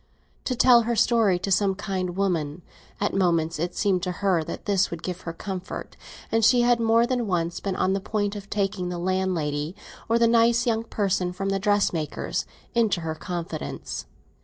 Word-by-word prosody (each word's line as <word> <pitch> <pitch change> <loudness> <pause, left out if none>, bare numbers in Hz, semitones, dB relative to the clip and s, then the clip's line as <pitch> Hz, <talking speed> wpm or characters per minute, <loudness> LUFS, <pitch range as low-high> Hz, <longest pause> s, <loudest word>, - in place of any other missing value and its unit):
To 255 - 0
tell 240 0 +6
her 235 - +1
story 220 -5 +3
to 195 +2 -4
some 195 0 +3
kind 185 -2 -3
woman—at 175 +1 -3
moments 170 -4 +1
it 175 +2 -2
seemed 195 -4 +1
to 180 +1 -2
her 185 -4 +1
that - - -7
this 195 -2 +2
would 170 -1 -7
give 180 -1 -4
her 165 - -5
comfort, 185 +2 -6 0.4
and 225 0 +2
she 240 +2 +6
had 240 0 +3
more 230 +1 +4
than 245 -2 -1
once 170 -2 -1
been 195 -2 -3
on 185 - +1
the 195 - 0
point 205 0 -1
of 200 -1 -8
taking 195 -3 -1
the 175 - -4
landlady, 175 -4 -1 0.3
or 230 - +4
the 235 - +4
nice 235 +1 +4
young 225 -1 0
person 195 -5 0
from 195 +2 -3
the 195 0 0
dressmaker's, 195 -6 0 0.3
into 220 -7 +2
her 160 -1 -3
confidence. 165 -1 -5
195 Hz, 185 wpm, -25 LUFS, 175-220 Hz, 0.4 s, tell